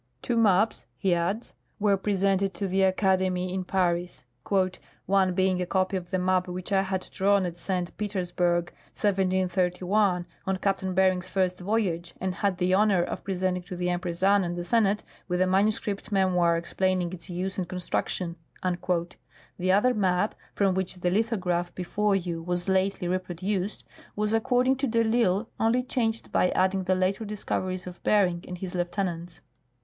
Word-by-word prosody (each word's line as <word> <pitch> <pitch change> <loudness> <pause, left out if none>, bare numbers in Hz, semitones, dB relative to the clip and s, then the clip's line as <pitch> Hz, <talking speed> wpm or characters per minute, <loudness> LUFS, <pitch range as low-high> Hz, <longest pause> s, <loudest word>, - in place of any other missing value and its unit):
Two 240 - 0
maps," 215 -1 +3
he 190 -3 +2
adds, 175 +7 -1 0.3
were 205 -1 +3
presented 195 -1 +1
to 195 +3 -2
the 190 +1 +1
Academy 185 -1 +2
in 190 0 -2
Paris, 180 -3 -1 0.4
" 185 - -17
one 190 -2 +2
being 185 -1 +2
a 180 - -2
copy 185 +1 +1
of 180 -2 -4
the 185 - 0
map 185 0 +1
which 180 +3 -6
I 195 -1 +4
had 190 -1 -3
drawn 200 0 +3
at 175 -1 -5
St. 180 -1 -2
Petersburg, 180 -4 0 0.2
1731, 185 -1 +1 0.2
on 190 0 +1
Captain 190 -1 -1
Bering's 185 -1 +2
first 185 -2 0
voyage, 180 -4 -1
and 190 0 -1
had 195 0 0
the 180 0 +1
honor 195 -2 +4
of - - -5
presenting 185 -1 -1
to 180 +1 -8
the 180 0 -1
Empress 175 0 -3
Anne 200 0 +5
and 175 0 -3
the 175 - -3
Senate, 210 +2 +2 0.2
with 180 -1 -1
a 185 - +4
manuscript 200 +2 0
memoir 180 -4 +3
explaining 180 +1 -1
its 185 +1 -9
use 185 +2 -3
and 180 - -3
construction." 180 -1 -2 1.2
The 185 +1 +2
other 210 +6 +4
map 190 -1 +1 0.2
(from 195 -2 +2
which 190 0 -2
the 180 0 -1
lithograph 185 -5 0
before 200 +3 0
you 175 -3 -2
was 175 +1 -2
lately 190 -1 +1
reproduced) 185 +2 -2 0.3
was, 210 +1 0
according 250 +3 +2
to 275 +1 0
de 230 -1 +2
I'Isle, 220 -2 +2
only 230 +3 +2
changed 230 -3 -1
by 180 - +3
adding 190 0 +1
the 185 0 +2
later 185 +4 0
discoveries 185 -3 -3
of 180 -1 -9
Bering 180 -5 +2
and 180 - -6
his 180 0 -6
lieutenants. 175 -1 -3
185 Hz, 165 wpm, -27 LUFS, 180-200 Hz, 1.2 s, Anne